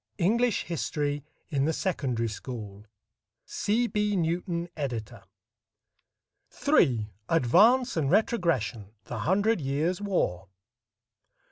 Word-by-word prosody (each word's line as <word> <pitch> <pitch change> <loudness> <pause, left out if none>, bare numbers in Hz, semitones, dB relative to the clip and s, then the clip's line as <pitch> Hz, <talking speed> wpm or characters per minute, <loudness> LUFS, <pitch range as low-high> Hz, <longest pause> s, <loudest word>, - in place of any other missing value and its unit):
English 225 +5 +2
History 145 -3 -2 0.3
in 140 -3 +1
the 160 - +1
Secondary 130 - -1
School 105 -2 -7 0.6
C. 225 +4 0
B. 210 -2 0
NEWTON, 170 0 -1
Editor. 120 -8 -4 1.5
III. 110 -5 +3 0.2
ADVANCE 200 - +4
AND 145 -4 +1
RETROGRESSION; 160 - 0
THE - - -6
HUNDRED 205 +3 +2
YEARS' 150 +8 -1
WAR. 105 - -1
160 Hz, 95 wpm, -28 LUFS, 125-200 Hz, 1.5 s, ADVANCE